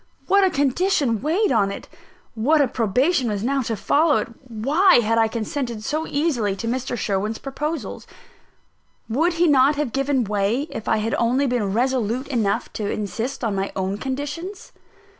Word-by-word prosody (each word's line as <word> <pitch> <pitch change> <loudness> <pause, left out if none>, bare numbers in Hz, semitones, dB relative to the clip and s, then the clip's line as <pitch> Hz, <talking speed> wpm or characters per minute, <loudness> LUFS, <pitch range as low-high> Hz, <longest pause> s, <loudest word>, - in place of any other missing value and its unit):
What 400 0 +4
a 380 - +4
condition 285 - +1
weighed 340 +8 +1
on 210 -5 +3
it! - - -8 0.5
What 275 +8 +2
a 285 - +4
probation 250 - +1
was 205 -1 -2
now 275 +3 +1
to 230 -2 -2
follow 300 - +2
it! - - -2 0.2
Why 290 - +3
had 230 -1 +3
I 225 - +4
consented 230 0 -4
so 310 +6 -2
easily 270 -10 0
to 230 - -5
Mr. 245 +1 -2
Sherwin's 210 +1 -1
proposals? 300 +4 -5 1.0
Would 320 +10 +1
he 340 +1 +2
not 285 -1 +4
have 285 -6 -2
given 275 -1 +1
way, 210 +4 0
if 220 - -7
I 220 - +2
had 220 +1 -1
only 250 +4 +2
been 240 -6 0
resolute 245 +2 0
enough 220 -7 -1
to 210 -2 -3
insist 225 +6 -3
on 220 -3 0
my 195 0 -2
own 190 +1 -2
conditions? 290 +9 -5
250 Hz, 170 wpm, -22 LUFS, 220-290 Hz, 1.0 s, What